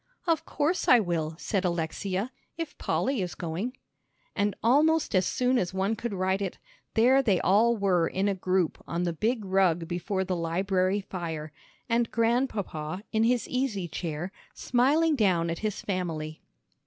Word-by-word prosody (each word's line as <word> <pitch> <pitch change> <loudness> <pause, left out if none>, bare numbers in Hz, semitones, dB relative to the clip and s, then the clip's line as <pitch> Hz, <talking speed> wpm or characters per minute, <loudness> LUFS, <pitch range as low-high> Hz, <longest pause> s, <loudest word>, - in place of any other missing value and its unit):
"Of 330 -2 +1
course, 325 +4 0
I 250 - +8
will," 165 -5 -1
said 195 +2 -1
Alexia, 185 +5 -2 0.3
"if 330 -3 -5
Polly 265 -4 0
is 180 -1 -4
going." 185 +10 -4 0.6
And 205 -1 +1
almost 305 +7 +3
as 185 -2 +3
soon 250 0 +2
as 180 +1 -2
one 195 +4 +1
could 235 +1 -4
write 190 0 0
it, 190 -3 -3 0.4
there 250 +4 +5
they 205 -9 +2
all 225 +5 +4
were 180 -5 +2
in 195 +2 0
a 200 - +2
group 185 -2 0
on 170 +1 -2
the 170 -1 0
big 220 +5 -1
rug 185 -3 +2
before 190 +3 -2
the 185 -1 -2
library 185 +3 0
fire, 165 -5 -5 0.4
and 235 0 +1
Grandpapa 215 - -1
in 220 +1 +2
his 245 0 +1
easy 250 -8 -1
chair, 170 +2 -4 0.2
smiling 295 +6 +2
down 180 -8 +2
at 165 - -4
his 215 -2 -2
family. 160 -5 -3
195 Hz, 160 wpm, -28 LUFS, 175-235 Hz, 0.6 s, I